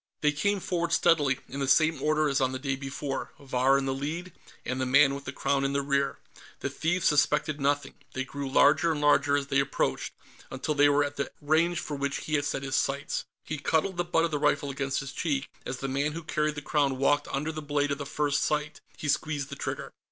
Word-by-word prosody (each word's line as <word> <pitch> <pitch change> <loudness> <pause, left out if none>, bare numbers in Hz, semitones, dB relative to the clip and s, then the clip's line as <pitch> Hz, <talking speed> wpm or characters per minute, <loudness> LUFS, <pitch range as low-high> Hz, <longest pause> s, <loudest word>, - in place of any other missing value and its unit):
They 150 - +4
came 200 +7 0
forward 170 -2 -2
steadily, 150 -7 +3
in 135 - -6
the 135 - -1
same 155 +1 +3
order 155 +1 +2
as 140 -1 +1
on 130 0 +1
the - - -2
day 135 0 -2
before, 135 +1 -5
Vahr 135 0 +2
in 135 - -1
the 135 - 0
lead 160 +6 -4 0.3
and 130 +1 -2
the - - +1
man 140 +2 +5
with 140 0 -6
the - - -4
Crown 140 0 0
in 135 0 0
the 140 0 0
rear. 140 -1 0 0.4
The - - -2
thieves 170 +3 0
suspected 150 0 +2
nothing; 145 +1 0 0.2
they 130 - -2
grew 140 +1 -5
larger 150 +4 +4
and 150 - -3
larger 145 -1 +4
as 140 - -2
they 140 0 +1
approached, 135 0 -1 0.3
until 130 +3 -2
they 145 0 +5
were 145 0 +4
at 145 0 -4
the 140 - -2
range 160 +4 +2
for 150 - -4
which 140 0 -2
he 155 - -4
had 145 -1 +2
set 135 -2 -2
his 135 -1 -2
sights. 140 +1 -1 0.2
He 155 -1 -4
cuddled 160 +6 0
the 175 - +1
butt 170 -1 +2
of 165 - -3
the 150 - -1
rifle 145 -1 +1
against 135 0 -2
his 135 0 -6
cheek. 140 -1 -1 0.2
As 125 - -3
the 135 - -4
man 140 +3 -1
who 165 +1 -6
carried 150 -1 -1
the 145 - -6
Crown 140 -3 +1
walked 145 +2 +2
under 150 +3 -2
the 155 0 -6
blade 145 -1 0
of 140 - -2
the 140 - -5
front 145 0 -1
sight, 150 +1 0 0.2
he 150 - -5
squeezed 145 -1 -1
the 140 - -6
trigger. - - -5
145 Hz, 240 wpm, -28 LUFS, 135-155 Hz, 0.4 s, man